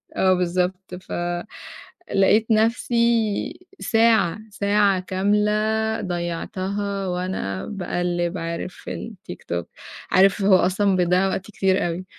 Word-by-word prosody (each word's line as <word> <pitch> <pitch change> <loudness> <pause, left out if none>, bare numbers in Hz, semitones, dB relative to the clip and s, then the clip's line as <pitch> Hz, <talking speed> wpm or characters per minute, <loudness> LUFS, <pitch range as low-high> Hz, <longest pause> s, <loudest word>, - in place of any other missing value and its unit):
آه، 185 -1 +3
بالضبط 180 +1 -1
ف 185 - -13 1.0
لقيت 210 +3 +4
نَفْسي 230 - +1 0.2
ساعة، 225 -6 +3
ساعة 200 -1 +2
كاملة 205 +3 +1 0.5
ضيّعتها 190 +3 -3
وأنا 180 - -3
باقلِّب 175 -2 -2
عارف 170 +2 -4
في 225 - -7 0.2
الtiktok، 85 -1 -5 0.5
عارف 195 +2 +4
هو 195 -1 +6
أصلًا 190 +2 +2
بيضيّع 180 +1 +2
وقت 190 0 -2
كتير 190 -3 0
أوي، 175 +2 -4
190 Hz, 105 wpm, -23 LUFS, 180-205 Hz, 1.0 s, هو